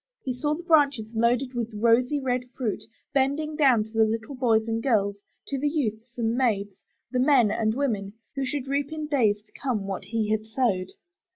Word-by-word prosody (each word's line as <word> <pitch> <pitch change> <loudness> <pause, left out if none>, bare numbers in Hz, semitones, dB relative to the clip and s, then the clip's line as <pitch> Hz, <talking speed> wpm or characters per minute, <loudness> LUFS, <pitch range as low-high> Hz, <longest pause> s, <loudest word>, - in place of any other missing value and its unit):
He 255 - -2
saw 295 +4 -1
the 345 - -8
branches 280 - +3
loaded 240 +3 +1
with 230 -2 -3
rosy 235 +6 +3
red 250 -2 -1
fruit, 230 -6 -2 0.3
bending 285 +3 +1
down 265 -8 +4
to 220 - -14
the 225 0 +4
little 220 +4 -2
boys 230 -4 +2
and 225 0 -1
girls, 205 -6 +1 0.3
to 275 - -2
the 290 +2 +1
youths 235 -5 -3
and 230 -1 0
maids, 205 -6 +1 0.4
the 250 - 0
men 255 -5 +4
and 220 0 0
women, 215 -8 -1 0.2
who 275 - -1
should 270 0 -3
reap 280 +1 -1
in 310 -1 -4
days 220 -9 +1
to - - -31
come 240 -8 -2
what 195 -1 -4
he 220 -2 -1
had 215 0 -1
sowed. 220 -6 0
240 Hz, 195 wpm, -26 LUFS, 220-275 Hz, 0.4 s, down